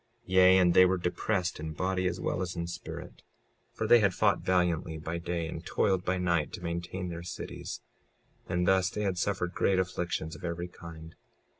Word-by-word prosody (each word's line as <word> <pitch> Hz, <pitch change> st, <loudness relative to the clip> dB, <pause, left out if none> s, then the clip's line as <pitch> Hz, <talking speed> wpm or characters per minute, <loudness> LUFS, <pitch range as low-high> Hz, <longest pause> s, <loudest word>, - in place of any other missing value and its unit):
56:16 -, -, -22 dB
Yea, 95 Hz, 0 st, +7 dB
and 90 Hz, -2 st, +5 dB
they 95 Hz, -, +8 dB
were 95 Hz, 0 st, +3 dB
depressed 90 Hz, 0 st, -1 dB
in 80 Hz, 0 st, -5 dB
body 90 Hz, +3 st, 0 dB
as 90 Hz, -, -2 dB
well -, -, -1 dB
as 90 Hz, -1 st, -3 dB
in 85 Hz, -1 st, -2 dB
spirit, 85 Hz, -, -8 dB, 0.5 s
for -, -, -3 dB
they 120 Hz, -, +7 dB
had 100 Hz, -4 st, +2 dB
fought -, -, +3 dB
valiantly 90 Hz, -3 st, +1 dB
by 80 Hz, +2 st, -4 dB
day 85 Hz, -1 st, -2 dB
and -, -, -6 dB
toiled 95 Hz, -2 st, +1 dB
by 95 Hz, 0 st, 0 dB
night 85 Hz, -4 st, +1 dB
to -, -, -6 dB
maintain 85 Hz, +2 st, -4 dB
their 85 Hz, 0 st, -5 dB
cities; 85 Hz, -, -6 dB, 0.7 s
and 90 Hz, 0 st, 0 dB
thus 95 Hz, -1 st, +4 dB
they 105 Hz, -, -3 dB
had 95 Hz, -3 st, -1 dB
suffered 90 Hz, -2 st, -1 dB
great 95 Hz, -, +2 dB
afflictions 90 Hz, -3 st, -2 dB
of -, -, -13 dB
every 85 Hz, 0 st, -3 dB
kind. 80 Hz, -2 st, -11 dB
90 Hz, 195 wpm, -30 LUFS, 85-95 Hz, 0.7 s, they